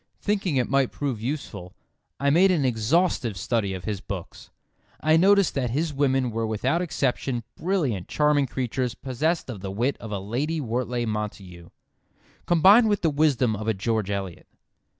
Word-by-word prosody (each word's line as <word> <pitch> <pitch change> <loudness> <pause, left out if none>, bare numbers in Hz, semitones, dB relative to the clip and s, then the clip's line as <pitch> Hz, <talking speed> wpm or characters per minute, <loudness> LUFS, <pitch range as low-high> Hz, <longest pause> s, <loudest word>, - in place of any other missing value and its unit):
Thinking 200 -6 -1
it 125 - +1
might 135 -2 +1
prove 135 -7 -3
useful, 115 -8 -5 0.4
I 140 0 +2
made 180 +6 +5
an 165 -7 +2
exhaustive 120 - +1
study 100 +2 -1
of 90 - -8
his 105 -3 -3
books. 95 -5 -8 0.5
I 155 +1 +3
noticed 195 +3 +4
that 130 -3 -1
his 150 +5 -1
women 135 -3 +1
were 115 0 -2
without 125 +10 0
exception 135 -6 -1
brilliant 150 - -1
charming 150 -2 +2
creatures 125 0 -2
possessed 150 +6 -1
of 120 -6 -6
the 95 - -5
wit 120 +8 -1
of 110 - -8
a 105 - -2
Lady 130 +12 -2
Wortlay 120 -1 -2
Montagu, 100 -5 -5 0.8
combined 195 +7 +6
with 205 -3 0
the 165 - +3
wisdom 140 -6 +2
of 110 +1 -6
a 110 - +1
George 110 0 -1
Eliot. 95 -4 -5
125 Hz, 165 wpm, -25 LUFS, 110-155 Hz, 0.8 s, combined